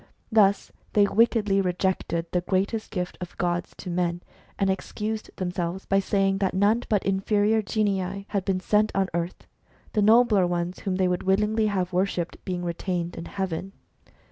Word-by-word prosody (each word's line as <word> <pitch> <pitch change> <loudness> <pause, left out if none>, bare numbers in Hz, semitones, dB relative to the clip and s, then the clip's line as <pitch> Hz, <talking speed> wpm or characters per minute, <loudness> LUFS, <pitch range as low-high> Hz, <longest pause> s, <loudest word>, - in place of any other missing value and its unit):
Thus 205 -2 +3 0.2
they 205 - +5
wickedly 210 -2 +3
rejected 180 -2 -1
the 180 - +1
greatest 195 +5 -1
gift 180 -3 -4
of 180 - -7
gods 175 0 -1
to 180 - -6
men, 175 0 -1 0.3
and 195 - +1
excused 215 +3 -3
themselves 180 0 -3
by 195 - +2
saying 195 0 +1
that 190 -2 0
none 205 +5 +3
but 210 -3 +1
inferior 205 +3 +2
genii 195 -2 -1
had 200 -3 -1
been 190 -1 0
sent 210 +2 +2
on 195 -1 +1
earth, 170 +1 -3 0.5
the 215 - +2
nobler 215 -3 +5
ones, 175 +1 -2
whom 190 -2 -2
they 185 0 +2
would 180 -1 0
willingly 210 +3 +2
have 185 -3 -1
worshipped, 180 -2 -1
being 180 -1 -3
retained 175 0 -3
in 165 - -6
heaven. 190 0 -4
195 Hz, 165 wpm, -26 LUFS, 180-205 Hz, 0.5 s, they